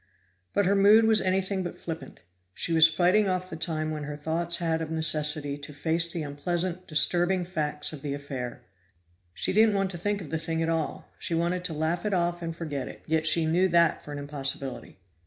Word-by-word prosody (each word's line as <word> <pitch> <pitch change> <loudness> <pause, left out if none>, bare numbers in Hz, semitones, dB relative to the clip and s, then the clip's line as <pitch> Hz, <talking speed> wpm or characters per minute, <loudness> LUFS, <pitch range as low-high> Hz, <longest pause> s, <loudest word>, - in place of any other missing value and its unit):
But 205 - +3
her 200 +2 +3
mood 210 +3 +6
was 220 -1 +5
anything 190 +1 0
but 175 - -5
flippant; 165 -1 -8 0.3
she 170 - -1
was 160 0 +7
fighting 180 +6 +3
off 185 0 -2
the - - -4
time 155 -1 -2
when 150 -1 -4
her 145 0 -6
thoughts 165 +3 0
had 165 -2 -1
of 160 - -4
necessity 150 -2 +1
to 145 +1 -9
face 165 +3 +1
the 165 -2 -3
unpleasant, 175 +5 -2
disturbing 175 +3 +3
facts 155 -4 -2
of 150 - -8
the 140 -1 -3
affair. 135 -4 -6 0.7
She - - 0
didn't 215 0 +4
want 195 -1 0
to 175 - -7
think 205 +3 -1
of 170 -7 -9
the 160 - -1
thing 165 0 -1
at 165 - -1
all; 165 -1 -2
she 170 - -2
wanted 175 +2 -1
to 170 - -3
laugh 160 +3 -1
it 210 -2 0
off 175 0 0
and 165 -1 -4
forget 145 -5 -4
it, - - -11
yet 160 0 +1
she 160 +1 +4
knew 175 +4 +3
that 170 -2 +3
for 150 - -9
an 145 - -5
impossibility. 140 -4 -3
165 Hz, 210 wpm, -27 LUFS, 155-180 Hz, 0.7 s, was